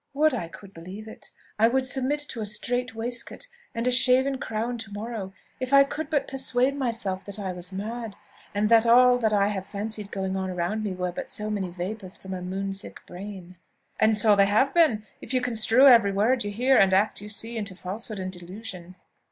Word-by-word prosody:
"Would 305 +1 +3
I 200 -9 -3
could 195 +3 -13
believe 185 +6 -9
it! 220 - -11 0.3
I 225 - +6
would 260 +2 +1
submit 265 +3 0
to 230 - -4
a - - -2
strait 245 +3 -2
waistcoat 240 - -5 0.3
and 230 +1 -2
a 250 - +3
shaven 260 +2 +3
crown 230 +2 -3
to 220 -3 -8
morrow 205 -2 -5 0.3
if 255 +1 -3
I 275 0 +9
could 295 +2 -5
but 295 -3 0
persuade 265 0 +1
myself 230 -8 -2
that 200 0 -7
I 190 -3 -4
was 180 +1 -2
mad, 220 +2 -5 0.4
and 210 +1 +2
that 230 0 +5
all 250 +1 +6
that 220 -3 +1
I 200 -1 +3
have 195 -2 -4
fancied 210 0 -4
going 190 -1 -3
on 190 0 -2
around 180 +4 -2
me 205 -3 -2
were 180 0 -2
but - - -6
so 215 0 -3
many 195 -3 -2
vapours 185 +2 -4
from 190 0 -8
a 185 - -5
moon 195 +2 -3
sick 195 - -6
brain." 185 -1 -9 0.4
"And 220 0 +4
so 210 0 +5
they 200 0 +5
have 220 +7 +2
been, 290 -12 +3 0.2
if 260 - -5
you - - +4
construe 245 +1 +4
every 230 -7 +7
word 225 +6 +2
you 205 - -3
hear, 250 +6 +3
and 195 -1 +5
every 195 - +6
act 215 - -7
you 210 - -8
see, 225 +3 -1
into 205 -4 -3
falsehood 205 +4 -4
and 185 -1 -4
delusion." 180 0 -9
215 Hz, 215 wpm, -26 LUFS, 195-245 Hz, 0.4 s, I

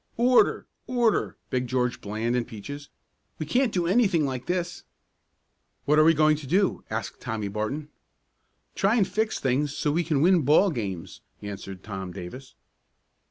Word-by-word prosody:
"Order! 245 +1 +4 0.2
Order!" 240 -4 +1
begged 125 -1 -1
George 125 -1 0
Bland 110 +4 -2
and 120 -1 -1
Peaches. 140 +6 -8 0.5
"We 155 - -4
can't 245 - +2
do 175 -3 0
anything 190 -5 +3
like 130 0 -4
this." 175 0 -2 1.0
"What 150 +2 +4
are - - +7
we 165 +1 +5
going 155 0 +4
to 145 -3 -9
do?" 190 +7 +1
asked - - -4
Tommy 110 -2 -3
Barton. 110 +9 -3 0.9
"Try 195 +4 +2
and 205 -6 +3
fix 220 0 -1
things 140 +2 0
so 150 - +1
we 170 +4 +1
can 155 -4 0
win 180 -1 +5
ball 155 +8 +4
games," 100 - -5 0.2
answered 95 -2 -7
Tom 95 -3 -6
Davis. 95 +9 -9
145 Hz, 160 wpm, -26 LUFS, 115-180 Hz, 1.0 s, are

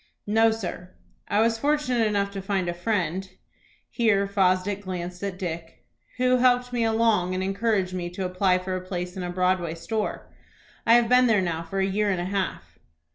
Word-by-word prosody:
"No, 225 +2 +4
sir; 185 -4 -5 0.3
I 205 - +2
was 225 0 +2
fortunate 255 -6 +1
enough 200 -1 0
to 195 -1 -5
find 195 -2 -1
a 175 - -1
friend," 185 -1 -2 0.6
here 210 -5 +2
Fosdick 195 0 +1
glanced 180 -2 -5
at 200 -2 -4
Dick, 165 -3 -6 0.3
"who 255 0 +3
helped 250 0 +2
me 240 -1 +1
along, 220 -5 +2
and 185 - -1
encouraged 195 -1 0
me 175 -1 -3
to 185 +2 -4
apply 185 0 +2
for 185 0 -4
a 185 - -3
place 180 0 -5
in 190 - -5
a 180 - -3
Broadway 180 -2 0
store. 215 +5 -4 0.5
I 230 - +7
have 240 -1 +4
been 250 +1 +5
there 220 -3 +4
now 170 -3 -1
for 170 +4 -4
a 190 - +2
year 205 +2 0
and 185 -3 0
a 175 - -2
half." 195 0 -4
195 Hz, 190 wpm, -25 LUFS, 180-225 Hz, 0.6 s, I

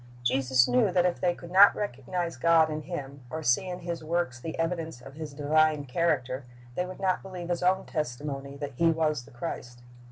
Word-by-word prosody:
Jesus 130 0 +3
knew 125 +9 +3
that 180 0 +3
if 180 - 0
they 175 -1 +2
could 170 - -11
not 195 +2 +8
recognize 175 -2 -3
God 160 +3 +4
in 155 0 -3
Him, 140 -4 -6
or 160 +3 -5
see 150 +9 +2
in 180 0 -5
His 170 -2 -4
works 165 -6 -1
the 160 +6 -6
evidence 165 -4 -2
of 135 +2 -12
His 155 0 -7
divine 150 +1 +2
character, 130 -3 0 0.3
they 180 +7 -2
would 185 - -9
not 185 -1 +1
believe 180 -2 -7
His 175 -1 -1
own 185 +1 +2
testimony 140 -1 -4
that 145 -1 -5
He 170 +2 +4
was 155 -5 0
the - - -16
Christ. 120 -2 -6
155 Hz, 200 wpm, -28 LUFS, 135-175 Hz, 0.3 s, not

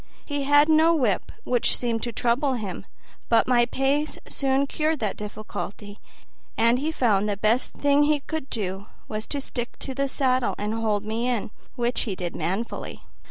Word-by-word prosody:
He 290 -2 -2
had 290 +1 +6
no 320 +1 +5
whip, 240 - 0
which 245 -2 +2
seemed 230 -2 -1
to 240 - -2
trouble 245 +5 +1
him; 200 -5 -5 0.4
but 230 -1 +5
my 240 -1 +4
pace 275 +4 0
soon 270 0 +1
cured 310 +3 0
that 210 -3 -1
difficulty, 205 -1 -7 0.6
and 230 +2 +4
he 305 +4 -1
found 210 -8 +2
the 200 - -1
best 220 +5 +1
thing 285 0 +3
he 295 0 +3
could 310 -1 -5
do 195 -2 -3 0.2
was 215 0 -4
to 285 - -2
stick 240 -3 -4
to 270 - -5
the 275 +1 0
saddle 255 -2 +1
and 210 +1 -2
hold 215 -2 0
me 225 +3 -1
in, 235 -4 -1 0.2
which 240 -1 0
he 205 -6 -2
did 175 -2 -4
manfully. 190 +8 -3
240 Hz, 175 wpm, -25 LUFS, 215-275 Hz, 0.6 s, had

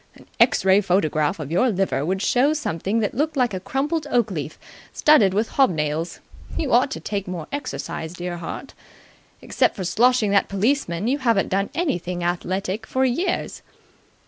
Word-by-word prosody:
An - - -17
X - - +4
ray 190 +2 +5
photograph 165 -3 +1
of 150 -1 -6
your 215 +10 +3
liver 195 -8 0
would 190 +5 -1
show 270 +5 +3
something 220 - -1
that 210 - -1
looked 300 +3 -1
like 245 -5 +2
a 185 - -2
crumpled 290 - -2
oak 235 -3 +1
leaf 150 -4 -5 0.3
studded 295 -11 +5
with 220 +2 +1
hob 270 -1 +3
nails. 155 0 -2 0.4
You 290 - -1
ought 250 +3 +4
to - - -5
take 200 -2 -4
more 175 -4 -5
exercise, 175 - -5
dear 175 -1 -5
heart. 175 +10 -7 0.7
Except - - +1
for 190 - -4
sloshing 220 +4 +2
that 200 - +2
policeman, 200 -3 0
you 275 +4 +1
haven't 230 -7 +1
done 195 +1 0
anything 180 - -2
athletic 185 +4 -2
for 260 0 +1
years." 340 +9 -1
200 Hz, 170 wpm, -22 LUFS, 175-255 Hz, 0.7 s, ray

